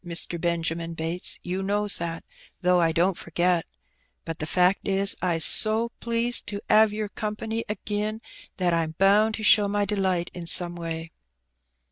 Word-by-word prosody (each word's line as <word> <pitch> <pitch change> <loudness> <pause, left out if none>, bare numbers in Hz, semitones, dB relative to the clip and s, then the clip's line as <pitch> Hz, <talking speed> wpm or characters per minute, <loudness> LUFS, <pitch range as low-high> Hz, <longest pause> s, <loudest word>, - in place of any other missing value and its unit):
Mister 170 0 0
Benjamin 165 0 -2
Bates^ 165 +2 -3
you 180 +2 -3
knows 205 +1 +1
that, 165 -1 -4 0.4
though 180 -1 +3
I 165 -1 +2
don't 175 +3 +1
forget. 175 0 0 0.6
But 165 -1 -6
the 155 - -3
fact 180 +4 +1
is, 195 0 +3
I's 170 -3 +1
so 225 +2 +3
pleased 235 +1 -1
to 205 - -2
'ave 215 -1 +5
yer 215 -1 -2
company 220 +2 -4
agin 210 +1 -3 0.4
that 180 -2 +1
I'm 160 -1 -1
bound 210 +3 +3
to 220 - -7
show 205 -1 +5
my 205 0 0
delight 190 -4 -1
in 175 -2 -5
some 175 +1 +4
way." 165 -1 -6
185 Hz, 160 wpm, -25 LUFS, 170-210 Hz, 0.6 s, ave